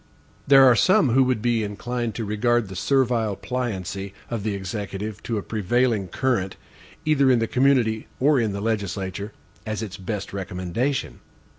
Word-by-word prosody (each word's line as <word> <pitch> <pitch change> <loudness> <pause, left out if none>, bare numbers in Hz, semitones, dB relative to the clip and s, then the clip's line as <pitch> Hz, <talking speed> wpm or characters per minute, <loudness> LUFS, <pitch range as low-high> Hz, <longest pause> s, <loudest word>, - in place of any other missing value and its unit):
There 135 -1 +8
are 125 -2 +7
some 185 - +4
who 130 +3 +5
would 125 -4 0
be 120 -2 +2
inclined 115 +2 -3
to 115 - -3
regard 110 +1 +1
the 95 - -8
servile 115 -2 +1
pliancy 100 -5 -4 0.2
of 115 -3 -2
the 105 0 -2
Executive 100 +2 -5
to 115 - -3
a 100 - -3
prevailing 110 0 0
current, 95 -2 -1 0.5
either 140 -3 +3
in 125 - +5
the 115 - +1
community 125 -3 +2
or 140 +1 +4
in 110 -3 0
the 100 0 -4
legislature, 100 -2 -3 0.3
as 110 0 -3
its 100 -3 -6
best 100 +1 -5
recommendation. 95 +8 -2
110 Hz, 160 wpm, -24 LUFS, 100-125 Hz, 0.5 s, There